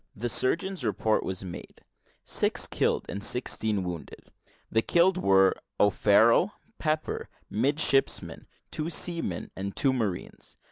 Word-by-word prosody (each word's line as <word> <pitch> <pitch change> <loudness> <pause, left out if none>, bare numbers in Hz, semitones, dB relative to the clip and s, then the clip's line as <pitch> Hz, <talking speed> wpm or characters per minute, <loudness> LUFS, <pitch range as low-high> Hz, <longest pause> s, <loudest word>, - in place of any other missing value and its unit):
The 120 +4 -3
surgeon's 170 +7 0
report 110 0 0
was 95 0 -4
made 90 -2 -10 0.4
six - - +2
killed - - 0
and 100 0 -5
sixteen 110 -3 0
wounded. 90 -3 -8 0.4
The 110 - +3
killed 180 +7 +2
were, 95 - +4 0.3
O'Farrel 110 - +4
and 220 - -33
Pepper, 155 0 -2 0.2
midshipmen, 135 +4 +1 0.2
two 155 +1 -3
seamen, 165 - -1
and 100 +1 -5
two 135 -2 +2
marines. 105 -8 -4
115 Hz, 125 wpm, -27 LUFS, 100-155 Hz, 0.4 s, were